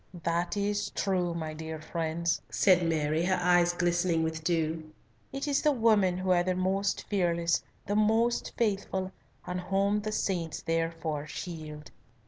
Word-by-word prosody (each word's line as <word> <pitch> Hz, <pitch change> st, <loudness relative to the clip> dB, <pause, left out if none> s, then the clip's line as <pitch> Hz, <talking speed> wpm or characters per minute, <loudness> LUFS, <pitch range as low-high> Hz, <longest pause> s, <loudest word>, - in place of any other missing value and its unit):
"That 170 Hz, +3 st, 0 dB
is 205 Hz, 0 st, 0 dB
true, 180 Hz, -3 st, -1 dB
my 160 Hz, -2 st, -4 dB
dear 160 Hz, 0 st, -6 dB
friends," 165 Hz, +1 st, -1 dB
said 185 Hz, -3 st, +4 dB
Mary, 160 Hz, -1 st, +1 dB
her 185 Hz, 0 st, +2 dB
eyes 175 Hz, 0 st, +4 dB
glistening 175 Hz, -1 st, +1 dB
with 160 Hz, 0 st, -3 dB
dew. 160 Hz, -1 st, -1 dB, 0.4 s
"It 275 Hz, +2 st, -4 dB
is 285 Hz, -1 st, +2 dB
the 300 Hz, -, +4 dB
women 215 Hz, -8 st, +3 dB
who 185 Hz, 0 st, 0 dB
are 175 Hz, -1 st, +5 dB
the 185 Hz, +1 st, 0 dB
most 190 Hz, +2 st, 0 dB
fearless, 170 Hz, -4 st, +1 dB, 0.2 s
the 205 Hz, -, -1 dB
most 225 Hz, +3 st, +2 dB
faithful, 195 Hz, -4 st, -1 dB, 0.3 s
and 180 Hz, 0 st, -3 dB
whom 195 Hz, +3 st, +1 dB
the 215 Hz, +1 st, -3 dB
saints 175 Hz, -6 st, -2 dB
therefore 165 Hz, -2 st, -2 dB
shield." 155 Hz, -2 st, -7 dB
175 Hz, 150 wpm, -29 LUFS, 165-195 Hz, 0.4 s, are